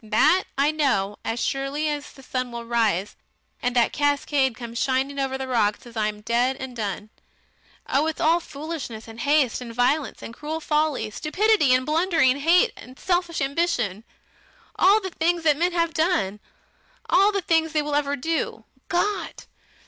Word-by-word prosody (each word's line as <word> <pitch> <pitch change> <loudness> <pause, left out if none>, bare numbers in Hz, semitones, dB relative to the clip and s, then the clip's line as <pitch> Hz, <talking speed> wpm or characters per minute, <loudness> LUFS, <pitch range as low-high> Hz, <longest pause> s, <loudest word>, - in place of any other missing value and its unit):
That 305 +12 +3
I 285 +2 +3
know 210 -10 0
as 225 +1 -2
surely 275 +4 -1
as 295 -1 -2
that - - -16
the 270 -2 -15
sun 255 -1 -2
will 235 0 -6
rise, 220 -5 0 0.5
and 245 0 -1
that 235 -2 +3
cascade 285 -3 +1
come 235 -1 -8
shining 265 +3 0
over 265 -1 -1
the 265 0 -5
rocks 225 -2 0
after 235 -2 -7
I 210 - +2
am 210 0 -5
dead 240 +4 +1
and 260 -2 -7
done.... 210 -1 -4 0.8
Oh! 295 +3 +1
It's 320 - -3
all 330 +2 +3
foolishness 295 -8 -7
and 225 0 -11
haste 285 -2 +2
and 240 -2 -7
violence 265 +4 0
and 230 - -7
cruel 305 +5 -5
folly, 300 -8 0
stupidity 360 - +2
and 255 0 +3
blundering 315 -4 +2
hate 355 +10 +4
and 255 +1 -13
selfish 350 -3 -1
ambition 270 - -1 0.7
all 405 +3 +5
the 380 -2 -5
things 335 +1 0
that 305 -2 +4
men 345 +4 +1
have 335 -2 0
done 315 - 0 0.7
all 395 +3 +4
the 400 - 0
things 320 -1 +2
they 305 -1 +1
will 295 0 -4
ever 285 -1 +1
do. 280 -6 -3 0.2
Gott! 405 +4 -2
280 Hz, 175 wpm, -24 LUFS, 240-320 Hz, 0.8 s, all